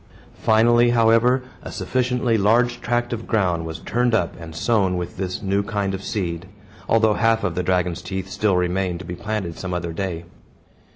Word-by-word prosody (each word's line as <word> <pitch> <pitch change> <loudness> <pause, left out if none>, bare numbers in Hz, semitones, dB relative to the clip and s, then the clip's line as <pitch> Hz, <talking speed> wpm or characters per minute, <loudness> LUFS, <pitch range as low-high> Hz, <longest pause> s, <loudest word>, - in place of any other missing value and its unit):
Finally, 120 +2 +4
however, 120 +2 +4 0.2
a - - -8
sufficiently 125 +4 0
large 115 +4 +2
tract 120 0 -1
of 115 -1 -5
ground 90 -6 0
was 80 - -5
turned 120 -1 +1
up, 85 -6 0
and 80 -1 -9
sown 95 -1 +1
with 90 0 -5
this 90 +1 -4
new 100 +1 +1
kind 100 -2 -2
of 95 - -4
seed; 90 -3 -3 0.4
although 110 -1 +4
half 115 +4 +2
of 95 -4 0
the 90 - -1
dragon's 90 -1 0
teeth 95 -1 -5
still 95 0 +1
remained 90 0 0
to 95 - -9
be 90 - -5
planted 95 -2 -4
some 90 -1 -3
other 85 -1 -3
day. 85 -2 -4
100 Hz, 180 wpm, -22 LUFS, 90-115 Hz, 0.4 s, Finally